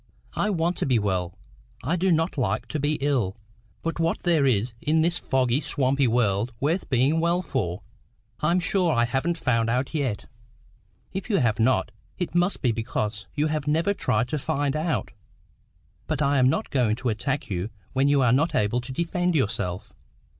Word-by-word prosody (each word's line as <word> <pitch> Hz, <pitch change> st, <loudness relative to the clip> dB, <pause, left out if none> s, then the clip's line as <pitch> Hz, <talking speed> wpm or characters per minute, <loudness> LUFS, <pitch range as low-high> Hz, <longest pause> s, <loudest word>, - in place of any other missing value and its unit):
'" -, -, -31 dB
"I -, -, +1 dB
want 175 Hz, -2 st, 0 dB
to -, -, -1 dB
be 125 Hz, -3 st, +3 dB
well 95 Hz, -4 st, -1 dB, 0.4 s
because 155 Hz, -, -2 dB
I -, -, +3 dB
don't 175 Hz, -1 st, +1 dB
like 120 Hz, -3 st, -1 dB
to 155 Hz, -, -2 dB
be 145 Hz, +2 st, +1 dB
ill. 125 Hz, -9 st, 0 dB, 0.5 s
But 165 Hz, 0 st, -3 dB
what 165 Hz, 0 st, 0 dB
there 160 Hz, -6 st, +3 dB
is 115 Hz, -1 st, +1 dB
in 160 Hz, +2 st, +2 dB
this 175 Hz, +1 st, +1 dB
foggy, 130 Hz, -1 st, +1 dB
swampy 135 Hz, -2 st, +1 dB
world 115 Hz, -1 st, +1 dB
worth 165 Hz, +7 st, -1 dB
being 135 Hz, +5 st, +3 dB
well 170 Hz, +2 st, +1 dB
for, 105 Hz, -, -3 dB, 0.6 s
I'm 170 Hz, +4 st, +2 dB
sure 180 Hz, -1 st, +1 dB
I 120 Hz, -4 st, +3 dB
haven't 135 Hz, +8 st, -1 dB
found 115 Hz, -6 st, +1 dB
out 125 Hz, +5 st, -1 dB
yet." 135 Hz, -9 st, -2 dB, 0.9 s
"If 195 Hz, +4 st, -5 dB
you 205 Hz, -, +3 dB
have 115 Hz, -, +1 dB
not, 115 Hz, -1 st, +2 dB, 0.3 s
it 180 Hz, -3 st, -3 dB
must 175 Hz, +1 st, +1 dB
be 125 Hz, -, +3 dB
because 110 Hz, -1 st, -3 dB
you 150 Hz, 0 st, +1 dB
have 155 Hz, -2 st, -2 dB
never 165 Hz, +7 st, +2 dB
tried 115 Hz, -, 0 dB
to 150 Hz, -, -1 dB
find 145 Hz, -1 st, -1 dB
out. 155 Hz, +1 st, -1 dB, 1.0 s
But 155 Hz, -3 st, -1 dB
I'm 140 Hz, -3 st, +3 dB
not -, -, -1 dB
going 120 Hz, -6 st, +2 dB
to 125 Hz, +1 st, -2 dB
attack 135 Hz, +4 st, -2 dB
you 90 Hz, +3 st, -2 dB, 0.2 s
when 135 Hz, +1 st, +2 dB
you 145 Hz, -2 st, +4 dB
are 125 Hz, -1 st, +4 dB
not 145 Hz, +6 st, +2 dB
able 105 Hz, +4 st, +1 dB
to 125 Hz, +2 st, -8 dB
defend 175 Hz, +4 st, 0 dB
yourself. 105 Hz, -, -1 dB
135 Hz, 185 wpm, -25 LUFS, 115-160 Hz, 1.0 s, you